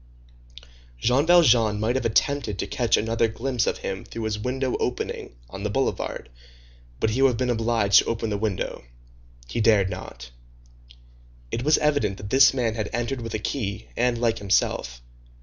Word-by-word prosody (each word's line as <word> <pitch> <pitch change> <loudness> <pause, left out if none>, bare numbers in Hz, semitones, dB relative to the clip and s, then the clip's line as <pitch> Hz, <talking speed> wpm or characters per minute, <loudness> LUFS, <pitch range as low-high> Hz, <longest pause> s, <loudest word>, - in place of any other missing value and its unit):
Jean 125 - +1
Valjean 120 -12 +5
might 110 +4 0
have 130 - -1
attempted 115 -2 0
to - - -2
catch - - +1
another 115 +1 +1
glimpse 120 +2 -2
of - - 0
him 95 0 -5
through 115 - -7
his 110 -1 -2
window 130 +3 -2
opening 125 - -4
on - - -9
the - - -2
boulevard, - - -2 0.7
but 110 - +1
he 130 +5 0
would 135 - +7
have 125 -3 -1
been 125 0 0
obliged 115 -3 +3
to - - 0
open 115 -1 -2
the 100 - -1
window: 105 - -3 0.6
he 115 - -2
dared 105 -4 +3
not. 60 -9 -9 1.2
It 115 - -2
was 155 +2 +4
evident 145 -10 +1
that 100 +1 -8
this 135 0 +7
man 120 -4 -1
had 110 -2 -3
entered 120 +2 -2
with 115 -2 -5
a - - +1
key, 100 -1 -4
and 120 0 +1
like 115 -1 0
himself. - - 0
115 Hz, 175 wpm, -24 LUFS, 105-125 Hz, 1.2 s, would